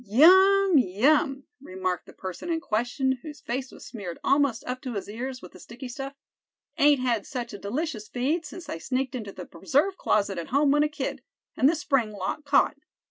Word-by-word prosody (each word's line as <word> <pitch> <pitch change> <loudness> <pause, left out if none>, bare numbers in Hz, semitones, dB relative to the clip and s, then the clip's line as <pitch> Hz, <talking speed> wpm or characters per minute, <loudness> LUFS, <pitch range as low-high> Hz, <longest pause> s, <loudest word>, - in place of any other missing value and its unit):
"Yum! 375 - +6
yum!" 270 - +2 0.2
remarked 185 - -3
the - - -13
person 190 - -7
in 330 -1 0
question, 255 0 -1
whose 300 -2 -9
face 260 +2 -4
was - - -12
smeared 200 -8 -7
almost 275 -5 +2
up 255 0 -4
to 250 -4 -5
his 200 - -4
ears 250 +4 -6
with - - -10
the - - -14
sticky 250 +3 -9
stuff; 270 +2 -6 0.6
"ain't 290 -1 +5
had 235 -5 +1
such 245 -3 -5
a - - -5
delicious 225 +1 -3
feed 285 +7 -1
since 335 +3 -9
I 165 - -5
sneaked 260 +5 -2
into 220 -6 -5
the 180 -2 -9
preserve 280 - 0
closet 200 -3 +1
at 165 - -6
home 280 +2 +3
when 295 +1 +4
a 300 - +2
kid, 295 - -4 0.3
and 265 - +4
the 335 - +2
spring 270 -8 0
lock 205 +10 -4
caught. 285 +1 +3
260 Hz, 195 wpm, -26 LUFS, 215-295 Hz, 0.6 s, Yum